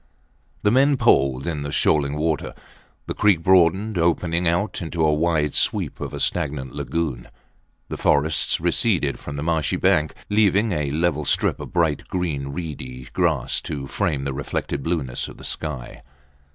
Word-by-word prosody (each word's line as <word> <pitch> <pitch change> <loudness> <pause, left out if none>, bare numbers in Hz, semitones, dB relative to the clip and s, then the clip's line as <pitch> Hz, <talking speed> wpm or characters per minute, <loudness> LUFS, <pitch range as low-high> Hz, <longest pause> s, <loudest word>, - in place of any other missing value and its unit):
The 105 - +4
men 135 +3 +4
poled 70 - +3
in 80 -4 -2
the 70 0 -4
shoaling 70 0 +2
water. 80 -2 -1 0.5
The - - -3
creek 100 -6 +3
broadened, 95 +3 +3
opening 85 +1 +1
out 85 +6 0
into 80 -1 -1
a 75 - +3
wide 75 -2 +1
sweep - - +1
of - - -5
a - - -6
stagnant 70 -3 -1
lagoon. 75 -4 -3 0.6
The - - -4
forests 75 0 +2
receded 85 - +1
from 75 - -7
the 70 - -4
marshy 80 -2 0
bank, 85 -5 +2
leaving 105 +1 +3
a 75 -5 -1
level 75 +1 0
strip - - +1
of - - -8
bright 80 -4 0
green, 80 -7 -2
reedy 70 -5 -7
grass - - 0
to 70 -3 -5
frame 75 -2 -1
the 70 0 -2
reflected 70 +1 -3
blueness 70 -6 -2
of - - -11
the - - -11
sky. 60 -1 -4
80 Hz, 160 wpm, -23 LUFS, 70-90 Hz, 0.6 s, The